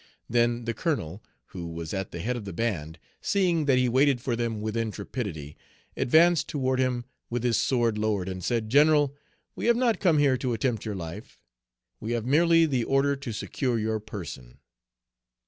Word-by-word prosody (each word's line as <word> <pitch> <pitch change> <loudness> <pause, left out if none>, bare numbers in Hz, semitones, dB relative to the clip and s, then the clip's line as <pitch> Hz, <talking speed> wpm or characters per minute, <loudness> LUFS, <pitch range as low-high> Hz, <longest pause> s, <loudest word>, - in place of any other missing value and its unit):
Then 120 0 +1
the 115 - -1
colonel, 110 - -2 0.3
who 85 -2 -6
was 80 -1 -6
at 95 -1 -3
the 85 - -6
head 125 +6 -1
of 120 - -5
the 100 -2 -7
band, 85 -7 -2 0.2
seeing 180 -6 +1
that 135 -3 +4
he 125 0 +3
waited 130 +2 +3
for 120 -1 -2
them 115 -2 -2
with 110 +1 -3
intrepidity, 100 - -4 0.4
advanced 165 +4 +4
toward 130 -2 0
him 125 -2 0 0.2
with 120 0 -2
his 120 -2 +2
sword 115 -4 +1
lowered, 105 -4 0
and 95 -1 -5
said, 115 -3 0
"General, 145 0 +4 0.4
we - - -3
have 235 0 +4
not 235 -5 +2
come 170 -5 +3
here 140 -3 +3
to 125 -1 -2
attempt 115 -2 -1
your 105 -2 -3
life. 85 -2 -8 0.6
We 110 +2 -3
have 115 -2 -2
merely 165 +4 +4
the 130 -6 0
order 135 +3 +2
to 135 -3 -6
secure 120 +3 -2
your 110 0 -1
person." 85 - -8
120 Hz, 180 wpm, -27 LUFS, 105-140 Hz, 0.6 s, that